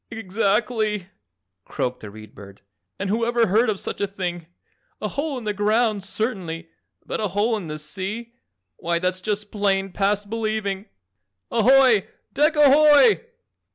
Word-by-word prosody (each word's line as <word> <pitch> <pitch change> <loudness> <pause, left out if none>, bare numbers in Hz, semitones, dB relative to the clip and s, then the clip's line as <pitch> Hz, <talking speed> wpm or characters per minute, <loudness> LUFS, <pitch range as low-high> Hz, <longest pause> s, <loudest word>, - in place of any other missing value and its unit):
"Exactly!" 215 -1 -1 0.5
croaked 125 0 -3
the 105 - -9
Read 110 +1 -13
Bird, 100 -1 -13 0.4
"and 200 - -3
whoever 230 +3 +1
heard 220 +5 +2
of 205 -3 -1
such - - -5
a 200 - +1
thing? 175 -4 -5 0.5
A - - -3
hole 285 -1 -3
in 245 - -7
the 210 -1 -2
ground, 210 0 +1
certainly, 185 -6 -4 0.4
but - - -4
a 215 - 0
hole 205 +5 0
in 200 -6 -5
the 155 0 -5
sea, 190 +10 -5 0.4
why 170 0 -1
that's 185 +1 -1
just 210 0 -3
plain 195 -2 0
past 205 +2 0
believing. 215 -2 -3 0.6
Ahoy, 245 -2 +5 0.3
DECK 300 +3 +3
AHOY!" 300 - +6
210 Hz, 145 wpm, -23 LUFS, 190-230 Hz, 0.6 s, AHOY